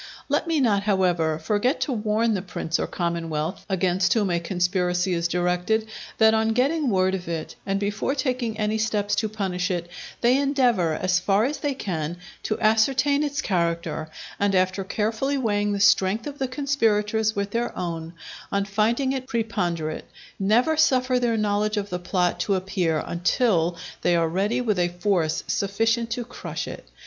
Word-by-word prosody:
Let -, -, +1 dB
me 325 Hz, -2 st, +1 dB
not, 215 Hz, -7 st, +3 dB
however, 180 Hz, -6 st, +1 dB
forget 210 Hz, -, 0 dB
to 290 Hz, -, 0 dB
warn 220 Hz, 0 st, +1 dB
the 195 Hz, -, -1 dB
prince 175 Hz, -3 st, -3 dB
or -, -, -1 dB
commonwealth 165 Hz, -2 st, -3 dB
against 185 Hz, +1 st, +2 dB
whom 205 Hz, -5 st, +1 dB
a 170 Hz, -, +1 dB
conspiracy 180 Hz, +1 st, 0 dB
is 170 Hz, 0 st, 0 dB
directed, 180 Hz, +5 st, 0 dB, 0.3 s
that 220 Hz, 0 st, +5 dB
on 220 Hz, 0 st, +2 dB
getting 275 Hz, +4 st, +1 dB
word 190 Hz, -2 st, +2 dB
of 180 Hz, -2 st, -4 dB
it, 165 Hz, -2 st, -4 dB
and 195 Hz, 0 st, 0 dB
before 205 Hz, +7 st, -1 dB
taking 255 Hz, -5 st, -1 dB
any 215 Hz, 0 st, 0 dB
steps 210 Hz, -2 st, 0 dB
to 215 Hz, +1 st, 0 dB
punish 190 Hz, -3 st, -2 dB
it, 175 Hz, -2 st, -2 dB, 0.3 s
they 245 Hz, +3 st, +4 dB
endeavour, 245 Hz, -, +2 dB
as 185 Hz, +2 st, +1 dB
far 200 Hz, +4 st, +2 dB
as 290 Hz, +3 st, -2 dB
they 285 Hz, -2 st, -1 dB
can, 170 Hz, -, -3 dB, 0.2 s
to 215 Hz, -, -2 dB
ascertain 265 Hz, +6 st, +3 dB
its 290 Hz, -1 st, -1 dB
character, 170 Hz, -3 st, -1 dB, 0.3 s
and 200 Hz, -1 st, +2 dB
after 185 Hz, +1 st, +1 dB
carefully 220 Hz, +8 st, -1 dB
weighing 205 Hz, -4 st, 0 dB
the 200 Hz, -, -1 dB
strength 195 Hz, +2 st, +3 dB
of 290 Hz, -1 st, -7 dB
the 265 Hz, -, 0 dB
conspirators 220 Hz, -6 st, +1 dB
with 200 Hz, 0 st, -2 dB
their 235 Hz, +2 st, -1 dB
own, 165 Hz, -1 st, -4 dB, 0.4 s
on 200 Hz, 0 st, +1 dB
finding 225 Hz, +7 st, +1 dB
it 260 Hz, -1 st, -3 dB
preponderate, 175 Hz, -10 st, -2 dB, 0.3 s
never 230 Hz, +10 st, +3 dB
suffer 255 Hz, -4 st, +3 dB
their 235 Hz, -2 st, +1 dB
knowledge 210 Hz, 0 st, 0 dB
of 205 Hz, 0 st, -3 dB
the 180 Hz, -, -2 dB
plot 180 Hz, 0 st, 0 dB
to 200 Hz, -, +1 dB
appear 185 Hz, -4 st, -1 dB
until 175 Hz, -1 st, +1 dB, 0.2 s
they 175 Hz, -, +3 dB
are 165 Hz, -1 st, +2 dB
ready 200 Hz, +9 st, 0 dB
with 215 Hz, -6 st, 0 dB
a 175 Hz, -, +3 dB
force 175 Hz, -2 st, 0 dB
sufficient 225 Hz, +4 st, 0 dB
to 240 Hz, +1 st, -3 dB
crush -, -, -6 dB
it. -, -, -8 dB
205 Hz, 175 wpm, -24 LUFS, 180-230 Hz, 0.4 s, that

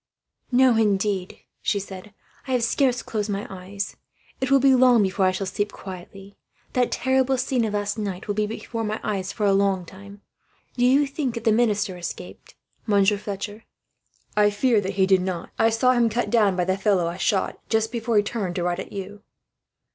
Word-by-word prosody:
"No, 255 Hz, -1 st, +5 dB
indeed," 200 Hz, -3 st, 0 dB, 0.2 s
she 205 Hz, -, 0 dB
said. 195 Hz, +1 st, -9 dB, 0.4 s
"I 260 Hz, -, -1 dB
have 245 Hz, -2 st, +1 dB
scarce 250 Hz, +1 st, +1 dB
closed 215 Hz, -1 st, -3 dB
my 200 Hz, 0 st, -2 dB
eyes. 195 Hz, +2 st, -6 dB, 0.4 s
It 265 Hz, -, -1 dB
will 275 Hz, 0 st, +5 dB
be 270 Hz, 0 st, +5 dB
long 250 Hz, -3 st, +5 dB
before 190 Hz, 0 st, +1 dB
I -, -, +3 dB
shall 195 Hz, +1 st, -3 dB
sleep 205 Hz, +2 st, -2 dB
quietly. 195 Hz, +1 st, -10 dB, 0.3 s
That 250 Hz, -1 st, +1 dB
terrible 260 Hz, 0 st, +1 dB
scene 250 Hz, -1 st, 0 dB
of 210 Hz, -1 st, -2 dB
last 205 Hz, +2 st, -2 dB
night 195 Hz, -2 st, -4 dB
will 205 Hz, -, 0 dB
be 210 Hz, 0 st, 0 dB
before 225 Hz, +1 st, -5 dB
my 215 Hz, 0 st, -2 dB
eyes 195 Hz, -2 st, -2 dB
for 210 Hz, -, -2 dB
a 200 Hz, -, +4 dB
long 195 Hz, -2 st, +1 dB
time. 200 Hz, +3 st, -13 dB, 0.5 s
Do 245 Hz, -1 st, +2 dB
you 275 Hz, +3 st, +4 dB
think 275 Hz, -3 st, -3 dB
that 230 Hz, -, -5 dB
the 225 Hz, -, +3 dB
minister 210 Hz, -4 st, +1 dB
escaped, 175 Hz, -, -8 dB, 0.3 s
Monsieur 205 Hz, -1 st, +3 dB
Fletcher?" 205 Hz, +1 st, -6 dB, 0.7 s
"I 210 Hz, 0 st, +5 dB
fear 215 Hz, +1 st, +2 dB
that 195 Hz, 0 st, -4 dB
he 190 Hz, -1 st, +3 dB
did 190 Hz, -1 st, +4 dB
not. 180 Hz, -2 st, -4 dB
I 225 Hz, -, +5 dB
saw 240 Hz, +3 st, +3 dB
him 240 Hz, -2 st, +3 dB
cut 235 Hz, +3 st, -2 dB
down, 210 Hz, -5 st, +3 dB
by 180 Hz, -1 st, 0 dB
the 190 Hz, +1 st, 0 dB
fellow 195 Hz, -4 st, +2 dB
I 170 Hz, +1 st, -3 dB
shot, 195 Hz, 0 st, 0 dB
just 220 Hz, 0 st, +1 dB
before 235 Hz, -2 st, 0 dB
he 205 Hz, -, +5 dB
turned 205 Hz, -5 st, -3 dB
to 175 Hz, -, -1 dB
ride 175 Hz, +1 st, -1 dB
at -, -, -7 dB
you." 200 Hz, +1 st, -7 dB
205 Hz, 200 wpm, -24 LUFS, 195-235 Hz, 0.7 s, No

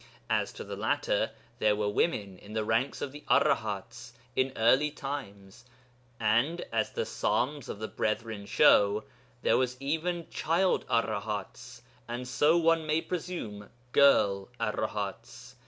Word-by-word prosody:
As -, -, +1 dB
to -, -, -7 dB
the -, -, -6 dB
latter, -, -, 0 dB, 0.3 s
there 105 Hz, -2 st, +3 dB
were 105 Hz, 0 st, -1 dB
women 105 Hz, -, 0 dB
in 105 Hz, -, -12 dB
the 110 Hz, -1 st, 0 dB
ranks 115 Hz, +5 st, 0 dB
of 135 Hz, -, -4 dB
the 145 Hz, +1 st, -11 dB
Arahats 110 Hz, +3 st, +1 dB, 0.2 s
in 130 Hz, 0 st, +2 dB
early 130 Hz, +7 st, +4 dB
times; 120 Hz, -9 st, -7 dB, 0.6 s
and, 120 Hz, +10 st, +1 dB
as 110 Hz, -1 st, +1 dB
the -, -, -1 dB
Psalms 140 Hz, +1 st, -1 dB
of -, -, -5 dB
the 110 Hz, +1 st, -4 dB
Brethren 110 Hz, -2 st, -3 dB
show, 100 Hz, +1 st, +5 dB, 0.4 s
there -, -, +4 dB
were 130 Hz, -, +3 dB
even 160 Hz, +5 st, -2 dB
child 175 Hz, +4 st, +1 dB
Arahats, 105 Hz, -3 st, -2 dB, 0.2 s
and, 120 Hz, +1 st, -5 dB
so 145 Hz, +6 st, +3 dB
one 165 Hz, -1 st, +2 dB
may 155 Hz, +1 st, +2 dB
presume, 165 Hz, -, -5 dB, 0.2 s
girl 100 Hz, -9 st, +4 dB
Arahats. 110 Hz, +3 st, -4 dB
120 Hz, 140 wpm, -29 LUFS, 105-150 Hz, 0.6 s, show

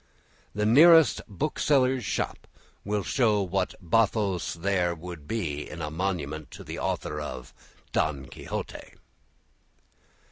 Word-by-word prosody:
The 105 Hz, 0 st, 0 dB
nearest 160 Hz, +6 st, +7 dB
bookseller's 130 Hz, +1 st, +1 dB
shop -, -, -3 dB, 0.4 s
will 105 Hz, 0 st, -1 dB
show 110 Hz, -4 st, +2 dB
what 95 Hz, 0 st, -1 dB
bathos 100 Hz, -1 st, +1 dB
there 90 Hz, 0 st, 0 dB
would 85 Hz, -3 st, -9 dB
be 75 Hz, -10 st, -3 dB
in -, -, -8 dB
a 75 Hz, -2 st, -4 dB
monument 80 Hz, -5 st, -3 dB
to -, -, -10 dB
the -, -, -6 dB
author 75 Hz, 0 st, -2 dB
of 65 Hz, -4 st, -7 dB, 0.4 s
"Don 70 Hz, -3 st, 0 dB
Quixote." -, -, -7 dB
95 Hz, 115 wpm, -27 LUFS, 80-110 Hz, 0.4 s, nearest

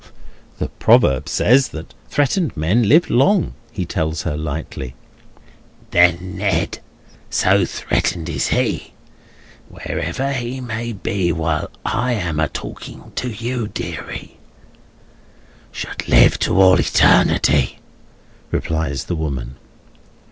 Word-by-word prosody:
"The -, -, -3 dB
proverb 65 Hz, -2 st, +3 dB
says 130 Hz, +3 st, +4 dB
that 80 Hz, 0 st, -9 dB, 0.2 s
threatened 145 Hz, -, 0 dB
men 100 Hz, +8 st, +2 dB
live 160 Hz, +6 st, +5 dB
long," 175 Hz, -, +3 dB, 0.2 s
he 95 Hz, -6 st, -3 dB
tells 80 Hz, -1 st, -2 dB
her, 80 Hz, -3 st, -2 dB
lightly. 75 Hz, -4 st, -5 dB, 1.0 s
"Then 90 Hz, +1 st, +3 dB
Ned—so 95 Hz, -5 st, -1 dB
threatened 85 Hz, -3 st, -1 dB
is -, -, -1 dB
he, -, -, -1 dB, 0.8 s
wherever 135 Hz, +1 st, -3 dB
he 125 Hz, 0 st, -3 dB
may 120 Hz, -1 st, -4 dB
be 95 Hz, -3 st, -1 dB
while 80 Hz, -2 st, -1 dB, 0.2 s
I 125 Hz, +2 st, 0 dB
am 85 Hz, -8 st, -2 dB
a 80 Hz, -, +2 dB
talking -, -, -9 dB
to 125 Hz, -, -1 dB
you, 120 Hz, +1 st, -3 dB
deary—should -, -, -10 dB
live -, -, +5 dB
to 95 Hz, -, +1 dB
all 95 Hz, -1 st, +6 dB
eternity!" 70 Hz, -3 st, +3 dB, 0.7 s
replies 80 Hz, -5 st, -2 dB
the 85 Hz, -, -3 dB
woman. 65 Hz, -6 st, -4 dB
90 Hz, 105 wpm, -19 LUFS, 80-120 Hz, 1.0 s, all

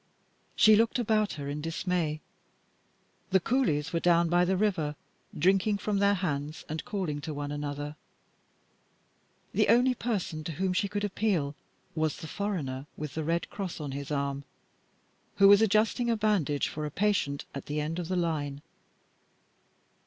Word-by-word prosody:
She 215 Hz, 0 st, +7 dB
looked 225 Hz, +3 st, +3 dB
about 215 Hz, -3 st, +1 dB
her 140 Hz, -2 st, -6 dB
in 145 Hz, +1 st, -3 dB
dismay. 165 Hz, -1 st, -1 dB, 1.1 s
The 190 Hz, -, +4 dB
coolies 175 Hz, -, 0 dB
were 170 Hz, -, +2 dB
down 170 Hz, -1 st, +3 dB
by 175 Hz, +1 st, +4 dB
the 190 Hz, +1 st, +1 dB
river, 180 Hz, -8 st, 0 dB, 0.4 s
drinking 195 Hz, +3 st, +3 dB
from 200 Hz, 0 st, -1 dB
their 200 Hz, 0 st, +4 dB
hands 155 Hz, -5 st, -3 dB
and 155 Hz, +1 st, -4 dB
calling 185 Hz, -11 st, -3 dB
to 155 Hz, 0 st, -5 dB
one 145 Hz, 0 st, -4 dB
another; 145 Hz, 0 st, -4 dB, 1.6 s
the -, -, +3 dB
only 250 Hz, +2 st, +5 dB
person 200 Hz, -10 st, -3 dB
to 165 Hz, -, -3 dB
whom 185 Hz, +4 st, 0 dB
she 195 Hz, +2 st, +1 dB
could 205 Hz, +1 st, -3 dB
appeal 190 Hz, -8 st, 0 dB, 0.4 s
was 155 Hz, -2 st, 0 dB
the 160 Hz, -, -8 dB
foreigner 150 Hz, -9 st, -3 dB
with 150 Hz, -2 st, -5 dB
the 160 Hz, -, -2 dB
red 165 Hz, +2 st, -1 dB
cross 195 Hz, -5 st, -5 dB
on 145 Hz, -3 st, -4 dB
his 140 Hz, +1 st, -5 dB
arm 140 Hz, -1 st, -2 dB, 0.9 s
who 195 Hz, -, +6 dB
was 200 Hz, +1 st, +8 dB
adjusting 220 Hz, +3 st, +2 dB
a 230 Hz, -, +2 dB
bandage 195 Hz, -10 st, +1 dB
for 150 Hz, 0 st, -4 dB
a -, -, -4 dB
patient 180 Hz, -5 st, 0 dB
at 140 Hz, -, -7 dB
the 150 Hz, +1 st, -2 dB
end 155 Hz, +3 st, -2 dB
of 175 Hz, -, -4 dB
the 185 Hz, -, -1 dB
line. 150 Hz, -5 st, -2 dB
170 Hz, 160 wpm, -29 LUFS, 150-205 Hz, 1.6 s, was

